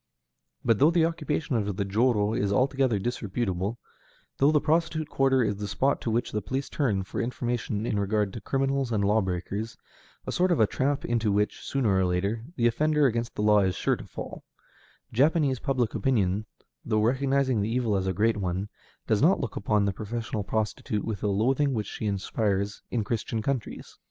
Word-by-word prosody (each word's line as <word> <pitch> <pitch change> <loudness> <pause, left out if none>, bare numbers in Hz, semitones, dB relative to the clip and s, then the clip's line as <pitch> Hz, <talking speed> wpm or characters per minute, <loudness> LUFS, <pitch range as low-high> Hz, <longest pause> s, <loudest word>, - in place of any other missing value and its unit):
But 115 -3 +3
though 145 - +6
the 170 -1 +3
occupation 155 -4 -2
of 100 -3 -2
the 100 - 0
jōrō 105 +1 +2
is 100 -2 0
altogether 130 0 +2
disreputable, 105 -2 -2 0.6
though 140 +2 +4
the 150 - +4
prostitute 155 0 0
quarter 135 -2 +3
is 105 -2 -1
the 105 0 -4
spot 140 +6 0
to - - -2
which 115 +2 0
the 105 - -1
police 130 +8 -3
turn 110 -10 0
for 95 - -4
information 120 -3 -2
in 105 - 0
regard 100 0 0
to 115 - -7
criminals 135 -2 0
and 105 -3 +1
law 105 +2 +3
breakers, 100 +4 -4 0.5
a - - -3
sort 180 +1 +2
of 170 - +2
a 110 - +6
trap 135 +6 -1
into 115 -3 +1
which, 105 +1 0
sooner 120 -8 0
or 95 - +3
later, 100 +5 -1
the 120 - +1
offender 150 +5 +3
against 115 -2 0
the 105 - -2
law 105 0 +5
is 95 -2 +1
sure - - +1
to - - -10
fall, - - -8 0.7
Japanese 140 0 +3
public 125 -3 0
opinion, 105 -3 +1 0.4
though 110 -2 +1
recognizing 130 -1 +2
the 105 - -1
evil 115 -3 +1
as 95 -1 0
a 95 - 0
great 110 +3 +2
one, 95 +1 -2 0.4
does 110 - +1
not 170 +7 +4
look 115 - -4
upon 105 0 +1
the 100 - 0
professional 110 +1 -4
prostitute 105 0 -2
with 110 -4 -3
the 105 - -1
loathing 130 +7 +2
which 105 -2 -1
she 110 - -4
inspires 100 0 -1
in 115 -3 -1
Christian 110 +1 -2
countries. 130 -4 -4
110 Hz, 190 wpm, -27 LUFS, 100-135 Hz, 0.7 s, though